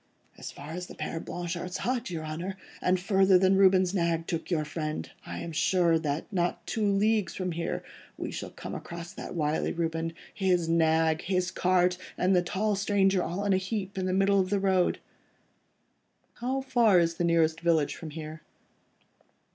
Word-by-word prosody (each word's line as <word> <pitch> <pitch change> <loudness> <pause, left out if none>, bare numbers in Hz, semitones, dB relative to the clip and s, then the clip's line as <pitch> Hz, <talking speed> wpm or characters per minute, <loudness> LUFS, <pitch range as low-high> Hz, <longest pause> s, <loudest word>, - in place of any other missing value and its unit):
"As - - -8
far 145 +2 -9
as 180 +2 -5
the - - -11
Père 165 - -4
Blanchard's 175 +1 -4
hut, 250 -2 -2
your 160 -3 -4
Honour, 170 +5 -5 0.2
and 185 0 +2
further 190 0 +4
than 190 +1 +4
Reuben's 190 -1 +4
nag 170 -3 0
took 165 -1 -3
your 155 -4 0
friend. 155 0 -4 0.2
I - - -5
am 170 - -5
sure 165 0 +3
that, 150 -1 -2
not 175 -1 -1
two 220 - -2
leagues 205 +1 +2
from 185 -1 -2
here, 165 0 -3 0.3
we - - -4
shall - - -5
come - - -8
across 170 0 -7
that - - -7
wily 150 -1 0
Reuben, 165 -1 -2 0.2
his 180 -4 +1
nag, 160 -1 +3
his 185 -1 0
cart 180 0 +2 0.2
and 185 +1 +3
the 180 - +4
tall 205 +4 -1
stranger 195 -1 +2
all 180 +5 -3
in 200 - +3
a - - +4
heap 190 0 -3
in 185 -1 -1
the - - 0
middle 195 +1 +3
of 185 -1 +1
the 200 0 +1
road." 190 -2 +2 1.4
"How 260 +3 -2
far 240 -7 +4
is 165 -1 +2
the - - 0
nearest 165 -1 +2
village 165 -4 +2
from 160 - -8
here?" 155 0 -7
180 Hz, 180 wpm, -28 LUFS, 165-195 Hz, 1.4 s, further